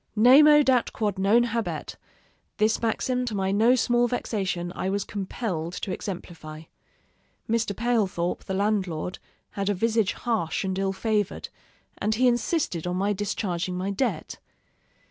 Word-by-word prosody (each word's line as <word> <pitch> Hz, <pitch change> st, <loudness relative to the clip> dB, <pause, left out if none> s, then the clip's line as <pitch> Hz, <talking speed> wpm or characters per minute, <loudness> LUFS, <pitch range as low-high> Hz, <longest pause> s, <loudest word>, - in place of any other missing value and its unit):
Nemo 295 Hz, +7 st, +7 dB
dat 255 Hz, -3 st, +2 dB
quod 205 Hz, -3 st, -2 dB
non 210 Hz, +5 st, +4 dB
habet 230 Hz, -1 st, -3 dB, 0.6 s
this 215 Hz, +1 st, +2 dB
maxim, 250 Hz, +2 st, 0 dB
to 225 Hz, -4 st, -3 dB
my 190 Hz, -1 st, 0 dB
no 225 Hz, +5 st, +4 dB
small 240 Hz, -1 st, +2 dB
vexation, 190 Hz, -7 st, -2 dB
I 190 Hz, -, -2 dB
was 200 Hz, 0 st, -1 dB
compelled 185 Hz, -4 st, -4 dB
to 190 Hz, -, -4 dB
exemplify. 165 Hz, -5 st, -7 dB, 0.8 s
Mr. 225 Hz, -2 st, 0 dB
Palethorp, 210 Hz, -7 st, 0 dB
the 190 Hz, -, -3 dB
landlord, 190 Hz, -4 st, -1 dB, 0.3 s
had 200 Hz, 0 st, -2 dB
a 205 Hz, -, +1 dB
visage 225 Hz, 0 st, +1 dB
harsh 220 Hz, -9 st, -1 dB
and 190 Hz, 0 st, -2 dB
ill 195 Hz, 0 st, 0 dB
favored, 210 Hz, 0 st, -1 dB, 0.5 s
and 215 Hz, +1 st, 0 dB
he 250 Hz, +3 st, +3 dB
insisted 240 Hz, -, 0 dB
on 180 Hz, -, -1 dB
my 200 Hz, +3 st, +1 dB
discharging 185 Hz, -3 st, -2 dB
my 190 Hz, +2 st, -2 dB
debt. 235 Hz, +6 st, -2 dB
205 Hz, 145 wpm, -26 LUFS, 185-230 Hz, 0.8 s, Nemo